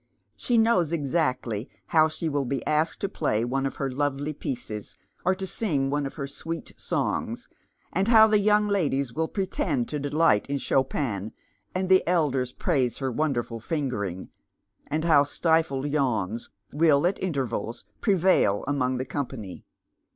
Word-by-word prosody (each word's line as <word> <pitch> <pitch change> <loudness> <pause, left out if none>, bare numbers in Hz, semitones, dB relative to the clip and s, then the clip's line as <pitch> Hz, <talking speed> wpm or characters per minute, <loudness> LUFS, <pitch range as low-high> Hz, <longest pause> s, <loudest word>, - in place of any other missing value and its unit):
She 245 - 0
knows 220 -8 +3
exactly 130 -7 -1 0.2
how 155 -1 +5
slie 160 +1 -3
will 145 -3 0
be 135 +2 -3
asked 155 +2 0
to 200 - +1
play 115 - 0
one 135 +2 0
of - - -6
her 135 -1 -2
lovely 145 +2 -1
pieces, 110 -7 -5 0.3
or 185 +1 +2
to 190 0 -4
sing 150 -9 -1
one 145 -1 0
of - - -10
her 140 - -4
sweet 165 +4 -6
songs, - - -2 0.5
and 190 +3 +1
liow 220 -2 +8
the 215 -1 +3
young 210 +1 +3
ladies 140 - 0
will 160 +3 0
pretend 160 - -1
to 150 - -2
delight 145 -5 +2
iu 140 - 0
Chopin, 130 -7 -1 0.4
and 185 0 0
the 185 0 +6
elders 140 -8 +1
praise 130 -6 0
her 135 -2 -2
wonderful 120 -4 -1
"fingering," 115 - -3 0.6
and 155 +2 -1
how 155 -4 +6
stifled 145 -1 +1
yawns 120 -7 -1 0.2
will 150 0 +4
at 185 +3 0
intervals 125 - -3 0.2
prevail 185 - +3
among 130 -3 0
the 130 - -2
company. 125 -9 -5
145 Hz, 155 wpm, -26 LUFS, 130-165 Hz, 0.6 s, liow